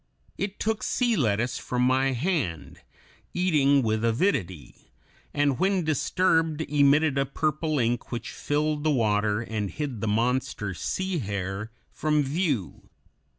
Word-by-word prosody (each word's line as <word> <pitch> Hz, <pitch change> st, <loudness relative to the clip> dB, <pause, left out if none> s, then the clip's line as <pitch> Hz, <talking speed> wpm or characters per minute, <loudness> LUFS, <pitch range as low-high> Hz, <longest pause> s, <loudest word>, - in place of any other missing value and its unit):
It 195 Hz, +1 st, -4 dB
took 220 Hz, 0 st, -1 dB
sea 240 Hz, -2 st, +1 dB
lettuce 120 Hz, -, 0 dB
from 125 Hz, 0 st, -1 dB
my 130 Hz, +1 st, +2 dB
hand, 125 Hz, -, -2 dB, 0.6 s
eating 145 Hz, -6 st, +3 dB
with 110 Hz, 0 st, 0 dB
avidity, 115 Hz, -, -1 dB, 0.4 s
and 145 Hz, -3 st, +1 dB
when 190 Hz, -1 st, +2 dB
disturbed 160 Hz, +1 st, +1 dB
emitted 145 Hz, -1 st, +3 dB
a 135 Hz, -, +2 dB
purple 155 Hz, +2 st, -1 dB
ink 120 Hz, -1 st, -1 dB
which 120 Hz, -1 st, -4 dB
filled 150 Hz, 0 st, -1 dB
the 155 Hz, -, +2 dB
water 105 Hz, -5 st, +1 dB
and 110 Hz, -3 st, -3 dB
hid 140 Hz, -6 st, -5 dB
the 110 Hz, -, -1 dB
monster 115 Hz, -1 st, 0 dB
"sea 185 Hz, -, -2 dB
hare" 100 Hz, -1 st, -4 dB, 0.2 s
from 150 Hz, -1 st, +1 dB
view. 140 Hz, -, -2 dB
135 Hz, 130 wpm, -26 LUFS, 110-155 Hz, 0.6 s, eating